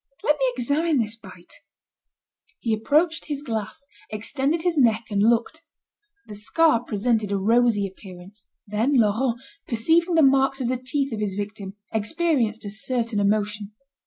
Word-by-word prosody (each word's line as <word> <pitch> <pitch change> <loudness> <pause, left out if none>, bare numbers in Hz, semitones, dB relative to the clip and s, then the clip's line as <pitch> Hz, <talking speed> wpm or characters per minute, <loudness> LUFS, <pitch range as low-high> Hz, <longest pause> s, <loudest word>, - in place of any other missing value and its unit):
Let 295 0 +2
me 265 -1 +2
examine 285 +6 +1
this 225 -2 -1
bite." 185 -6 -13 1.1
He 230 - -1
approached 305 +9 +1
his 290 -2 -5
glass, 225 0 -5 0.2
extended 275 +9 -2
his 355 -2 +1
neck 235 -5 +3
and 200 -1 +1
looked. 235 +8 +1 0.6
The 210 - -10
scar 235 +5 +2
presented 215 -1 0
a 200 - +1
rosy 225 +1 +2
appearance. 190 +1 -12 0.2
Then, 220 +7 0
Laurent, 230 +2 +1 0.3
perceiving 330 +9 +2
the 320 - +5
marks 270 0 +3
of 245 -2 -1
the 255 - 0
teeth 265 +1 -2
of 215 - -4
his 205 -3 -2
victim, 205 -1 -6 0.2
experienced 225 -1 0
a 200 - -5
certain 230 -1 -1
emotion. 210 0 -1
230 Hz, 150 wpm, -24 LUFS, 210-275 Hz, 1.1 s, the